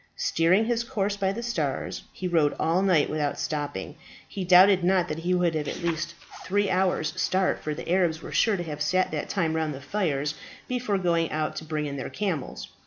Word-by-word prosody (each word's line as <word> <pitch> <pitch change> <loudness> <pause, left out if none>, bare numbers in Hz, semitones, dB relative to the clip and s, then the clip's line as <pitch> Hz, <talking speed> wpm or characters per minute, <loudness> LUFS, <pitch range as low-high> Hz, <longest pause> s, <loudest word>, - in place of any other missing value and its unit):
Steering 180 +6 +3
his 235 0 0
course 205 -3 -1
by 195 -1 0
the 230 +4 -5
stars, 165 - -2
he 185 - -4
rode 160 -4 +2
all 165 +3 +2
night 180 -7 +3
without 150 -2 -2
stopping. 145 -11 -3 0.3
He 195 - -5
doubted 185 +1 +6
not 180 -1 +3
that 155 - -3
he 180 +2 0
would 175 -2 +2
have 150 -2 -2
at - - -5
least 170 0 -2 0.3
three 205 +1 +1
hours' 180 -4 +1
start, 185 0 +1
for 155 -1 -3
the - - -8
Arabs 175 -3 +2
were - - -9
sure 220 -3 +3
to 175 - -3
have 150 -3 -6
sat 185 +5 +1
that - - -3
time 165 -5 0
round 160 -2 -1
the - - -8
fires 150 -3 -1 0.3
before 245 -5 -1
going 170 -3 +1
out 155 0 -2
to 160 - -5
bring 155 -1 -2
in 140 -1 -4
their 130 - -4
camels. 185 -10 -3
170 Hz, 210 wpm, -26 LUFS, 155-190 Hz, 0.3 s, doubted